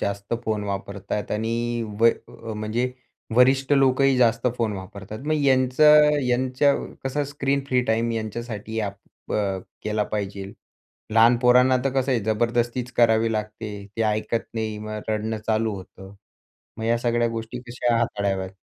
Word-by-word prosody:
जास्त 100 +2 -2
फोन 105 -2 -1
वापरतात 100 +1 -4
आणि 115 +2 -1 0.2
व 115 - +7 0.5
म्हणजे 115 +4 -2 0.4
वरिष्ठ 130 +2 +4
लोकही 135 0 +4
जास्त 115 0 +3
फोन 115 -3 0
वापरतात. 100 +2 -8
मग 155 - +2
यांचं 150 +3 +5
यांचं 130 +3 +1
कसं 145 +2 -1
स्क्रीन 140 -1 -1
फ्री 125 -2 +2
टाईम 115 0 +1
यांच्यासाठी 110 0 -5
आपण 100 -1 -8
अ, 100 -2 0 0.2
केला 105 0 0
पाहिजे. 100 -1 -4 0.6
लहान 115 +2 +6
पोरांना 125 +1 +5
तर 135 - +2
कसं 135 0 0
आहे, 120 - +1
जबरदस्तीच 120 +2 0
करावी 115 -1 +4
लागते. 105 0 -4 0.2
ते 115 - +1
ऐकत 110 +1 -1
नाही, 110 -2 -3
मग 110 0 -5
रडणं 110 +1 -1
चालू 110 -1 +1
होतं 95 +1 -11 0.6
मग 110 - -5
या 115 +1 +2
सगळ्या 120 0 +1
गोष्टी 115 +1 -5
कशा 120 0 0
हाताळाव्यात? 100 -4 -1
115 Hz, 140 wpm, -24 LUFS, 105-125 Hz, 0.6 s, व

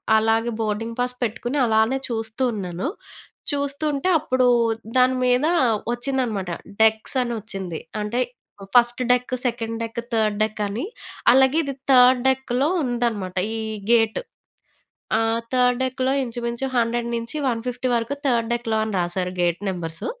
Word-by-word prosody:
అలాగే 225 +2 +2
boarding 225 +2 -2
pass 250 0 0
పెట్టుకొని 240 +4 -2
అలానే 220 +3 +3
చూస్తూ 225 +1 -3
ఉన్నాను. 185 0 -4 0.7
చూస్తూ 285 +1 -2
ఉంటే 280 +5 -1
అప్పుడు 255 -4 +1 0.5
దాని 255 0 +4
మీద 250 +2 +3 0.5
వచ్చిందనమాట, 240 -7 -2 0.3
డెక్స్ 220 +3 +2
అని 240 -1 -2
వచ్చింది. 190 -6 -6 0.2
అంటే 220 +4 -1 0.5
first 240 +1 +4
deck, 250 +1 0
second 230 -1 -2
deck, 230 +1 -4
third 215 -2 +1
deck 215 0 -5
అని. 225 - -3 0.5
అలాగే 265 +3 +4
ఇది 275 -2 -4 0.2
థర్డ్ 250 -1 +6
డెక్‌లో 265 +1 +1 0.2
ఉందన్నమాట. 230 -7 -2 0.2
ఈ - - -3 0.3
గేట్. 225 -2 +3 1.0
ఆ! - - +1 0.3
థర్డ్ 250 0 +3
డెక్‌లో 260 +1 0
ఇంచుమించు 235 +1 -3
100 235 0 0
నుంచి 230 +6 -6
150 245 +2 -3
వరకు 230 +4 -1
థర్డ్ 235 -2 +1
డెక్‌లో 230 -2 -1
అని 220 - -4
రాసారు 180 +1 -2
గేట్ 175 +1 +1
నంబర్స్. 165 -3 -5
235 Hz, 135 wpm, -23 LUFS, 220-255 Hz, 1.0 s, థర్డ్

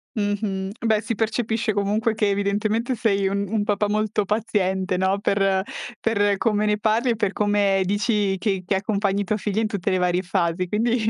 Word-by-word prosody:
Mh-mh. 205 -2 -2
Beh, 220 -1 +3
si 225 +1 -3
percepisce 225 0 -1
comunque 210 +3 0
che 210 -2 +1
evidentemente 210 +5 0
sei 200 -4 +1
un 200 +1 -1
un 215 0 0
papà 205 0 0
molto 215 -1 0
paziente, 190 -3 0
no, 190 +2 +1
per 195 -2 +2 0.4
per 205 -2 +2
come 215 -1 +1
ne 210 0 +2
parli 225 +3 +1
e - - 0
per 205 -3 0
come 205 -2 +2
dici 205 -1 +1
che 190 -1 -1
che 195 - +1
accompagni 200 0 0
tua 210 +3 -1
figlia 210 +1 -1
in 220 - +1
tutte 200 -5 -2
le 185 - +2
varie 180 0 +1
fasi. 180 -1 -1
Quindi 220 +2 +1
205 Hz, 185 wpm, -23 LUFS, 195-215 Hz, 0.4 s, Beh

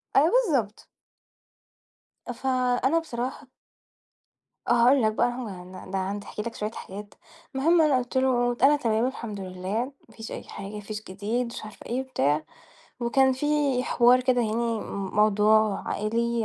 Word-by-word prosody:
آه 300 +4 +6
بالضبط. 310 - +1 1.5
فأنا 255 +4 +1
بصراحة 260 -2 -5 1.2
آه - - +1
هاقول 245 +3 +5
لك 215 - +3
بقى، 240 - +2
هو 245 - -5
يعن 180 -2 -9
ده 185 - -9
أنا 195 - -4
عندي 200 +2 -3
احكي 210 - -6
لك 230 +1 -5
شوية 210 +1 -3
حاجات، 205 -1 -9 0.4
المهم 325 +5 +4
أنا 300 -4 +4
قُلت 250 +1 -3
له: 245 -2 +2
"أنا 285 +2 +7
تمام 230 -4 +1
الحمد 235 -6 -6
لله، 190 +5 -3 0.2
ما 225 - -19
فيش 220 0 -8
أي - - -6
حاجة، 195 +1 -8
ما - - -5
فيش 210 +1 -6
جديد،" 210 +6 -2
ومش - - -7
عارفة 215 - -11
إيه 245 +2 -2
وبتاع 150 - 0 0.6
وكان 265 +3 +3
في 260 +3 -3 0.4
حوار 245 +1 +5
كده 255 -1 +2
يعني 220 -1 -1 0.2
م 200 -2 -5
موضوع 215 0 +3
عائلي 230 +2 -1
235 Hz, 160 wpm, -26 LUFS, 210-255 Hz, 1.5 s, أنا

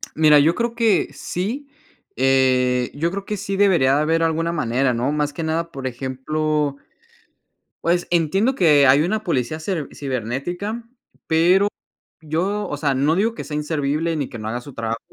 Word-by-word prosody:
Mira, 155 -1 +6
yo 155 +4 +4
creo 235 0 -2
que 230 -3 +2
sí, 235 +11 -4 0.5
eh, 130 -1 +2
yo 165 +4 -1
creo 195 +2 -5
que 210 - -3
sí 195 0 -4
debería 175 -10 +4
de 145 - +2
haber 165 +2 +1
alguna 165 +1 0
manera, 130 -4 0
¿no? 125 +4 -1
Más 150 -1 -1
que 165 - -5
nada, 165 +1 -1
por 135 -4 -6
ejemplo 140 +3 -2 1.1
Pues, 175 +1 +1
entiendo 185 - +2
que, 155 - +5
eh, - - +6
hay 135 +2 +6
una 215 +6 -1
policía 140 - -1
cer 160 -3 -3
cibernética, 140 - -4 0.4
pero 180 +5 +4 0.5
yo, 185 +7 -2
o 145 - -4
sea, 140 -2 0
no 140 +5 +2
digo 220 +5 +1
que - - -7
sea 150 - -6
inservible 150 +2 -1
ni 145 -4 -3
que 120 - -8
no 110 -1 -6
haga 120 +3 -3
su 140 +2 -11
trabajo. 115 0 -3
155 Hz, 180 wpm, -21 LUFS, 135-180 Hz, 1.1 s, Mira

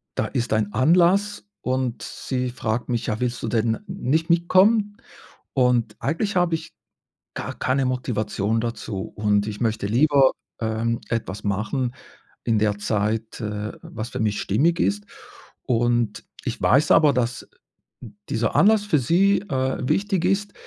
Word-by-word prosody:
da - - 0
ist 120 -2 -2
ein 105 -1 0
Anlass 175 - +3 0.2
und 130 -1 -2
sie 125 -1 -3
fragt 120 0 -3
mich: 120 -2 -1
„Ja, 110 0 -1
willst 125 -1 -2
du - - -1
denn 115 0 0
nicht 160 +6 -1
mitkommen?“ 205 +5 +3 0.6
Und 125 -4 +2
eigentlich 185 +7 -1
habe 175 -2 +2
ich 160 0 -7 0.6
gar - - -4
keine 130 +1 0
Motivation 110 -4 -1
dazu 110 -4 -4
und 105 -1 +1
ich 105 -1 -6
möchte 110 -3 0
lieber, 135 +4 +4 0.3
ähm, 115 +1 -1
etwas 105 -4 -3
machen 110 +6 -1 0.5
in 115 -2 +2
der 105 -1 +1
Zeit, 110 +2 -2
äh, 105 -1 -4
was 115 +1 -7
für - - -5
mich 105 -2 0
stimmig 155 - +1
ist. 100 +1 0 0.6
Und 120 -2 0 0.2
ich - - -4
weiß 145 +4 +4
aber, 150 -3 +6
dass 125 -1 -2 0.8
dieser 115 -1 0
Anlass 210 +1 +5
für 185 -8 +2
sie, 185 +9 +3
äh, 130 -7 -1
wichtig 195 -3 +1
ist. 200 +2 0
120 Hz, 145 wpm, -23 LUFS, 110-160 Hz, 0.8 s, aber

